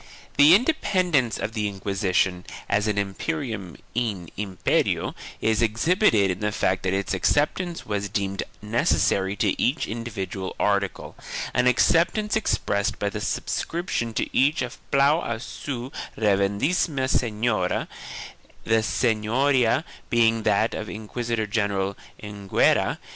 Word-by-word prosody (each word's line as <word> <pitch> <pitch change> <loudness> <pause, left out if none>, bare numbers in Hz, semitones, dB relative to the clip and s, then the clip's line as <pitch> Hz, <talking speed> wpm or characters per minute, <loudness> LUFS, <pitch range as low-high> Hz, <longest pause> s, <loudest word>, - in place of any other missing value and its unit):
The 145 +5 +8
independence 185 - +1
of 110 - -4
the 105 -2 -1
Inquisition, 95 -2 0 0.2
as 105 +1 +1
an 105 -1 0
imperium 105 - -3 0.2
in 105 -8 -2
imperio, 95 -2 0 0.3
is 110 0 +2
exhibited 115 - +3
in 90 - -4
the 105 0 -1
fact 95 -2 0
that 95 0 -1
its 100 0 -1
acceptance 155 - 0
was 100 -1 -2
deemed 100 0 -2 0.2
necessary 100 -3 +1
to 100 -2 0
each 135 +6 +1
individual 100 -4 -5
article, 100 -1 -1 0.4
an 125 0 +3
acceptance 170 - +3
expressed 100 - 0
by 100 0 -1
the 105 - -5
sub 95 - -2
scription 165 -9 -2
to - - -2
each 140 +1 +3
of 125 +2 -7
Plan 140 +4 +4
a 115 -1 -3
su 125 +1 -6 0.3
Reverendissima 110 - +1
senyoria, 110 -6 0 0.8
the 115 0 +2
sen 110 0 +1
yoria 125 +3 +2 0.3
being 115 -1 +3
that 110 +2 +2
of 110 -2 -5
Inquisitor 110 +3 -3
general 100 -2 -1 0.3
Enguera. 100 -2 +1
110 Hz, 125 wpm, -24 LUFS, 100-130 Hz, 0.8 s, The